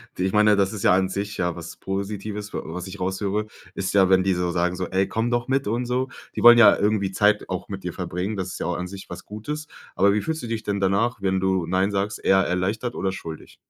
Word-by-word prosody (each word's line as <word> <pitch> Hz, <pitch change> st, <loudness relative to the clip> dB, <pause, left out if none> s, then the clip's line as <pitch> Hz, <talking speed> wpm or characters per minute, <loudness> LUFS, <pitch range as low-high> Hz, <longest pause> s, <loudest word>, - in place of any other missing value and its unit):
ich 95 Hz, +1 st, 0 dB
meine, 105 Hz, 0 st, +5 dB
das 100 Hz, 0 st, +1 dB
ist 105 Hz, -, -5 dB
ja -, -, +5 dB
an 95 Hz, 0 st, +2 dB
sich 100 Hz, +2 st, -4 dB
ja 90 Hz, -1 st, -1 dB
was 85 Hz, -1 st, -8 dB
Positives, 100 Hz, +1 st, -4 dB
wa -, -, -2 dB
was 90 Hz, -, -6 dB
ich 95 Hz, +1 st, -9 dB
raushöre, 100 Hz, +3 st, -1 dB, 0.3 s
ist 95 Hz, 0 st, -3 dB
ja, 95 Hz, -2 st, +5 dB
wenn 95 Hz, -1 st, +5 dB
die 95 Hz, -1 st, +1 dB
so 90 Hz, 0 st, -1 dB
sagen 90 Hz, +1 st, 0 dB
so: 90 Hz, 0 st, -3 dB
„Ey, 95 Hz, +1 st, +1 dB
komm 115 Hz, +2 st, -1 dB
doch 120 Hz, -1 st, 0 dB
mit 135 Hz, +1 st, +1 dB
und 120 Hz, +3 st, -1 dB
so.“ 125 Hz, +1 st, -1 dB, 0.3 s
Die -, -, -3 dB
wollen 120 Hz, 0 st, +9 dB
ja 115 Hz, -, +8 dB
irgendwie 100 Hz, -2 st, +1 dB
Zeit 105 Hz, +1 st, +2 dB
auch -, -, -4 dB
mit -, -, -7 dB
dir -, -, -4 dB
verbringen. 95 Hz, +5 st, -3 dB
Das 95 Hz, -2 st, -3 dB
ist -, -, -7 dB
ja -, -, -2 dB
auch 90 Hz, -, -1 dB
an 90 Hz, -, -4 dB
sich 95 Hz, +1 st, -10 dB
was -, -, -8 dB
Gutes. 150 Hz, +9 st, -6 dB, 0.3 s
Aber 100 Hz, +2 st, +4 dB
wie 105 Hz, -, +1 dB
fühlst 160 Hz, +4 st, -3 dB
du -, -, -4 dB
dich 115 Hz, -1 st, -3 dB
denn 100 Hz, -2 st, -2 dB
danach, 100 Hz, +5 st, +1 dB
wenn 95 Hz, -1 st, 0 dB
du 95 Hz, -2 st, +1 dB
„nein“ 95 Hz, +3 st, +1 dB
sagst, 100 Hz, +1 st, -2 dB
eher 95 Hz, -, +5 dB
erleichtert 100 Hz, +7 st, -1 dB
oder 95 Hz, -, -1 dB
schuldig? 80 Hz, -4 st, -9 dB
100 Hz, 260 wpm, -24 LUFS, 95-110 Hz, 0.3 s, wollen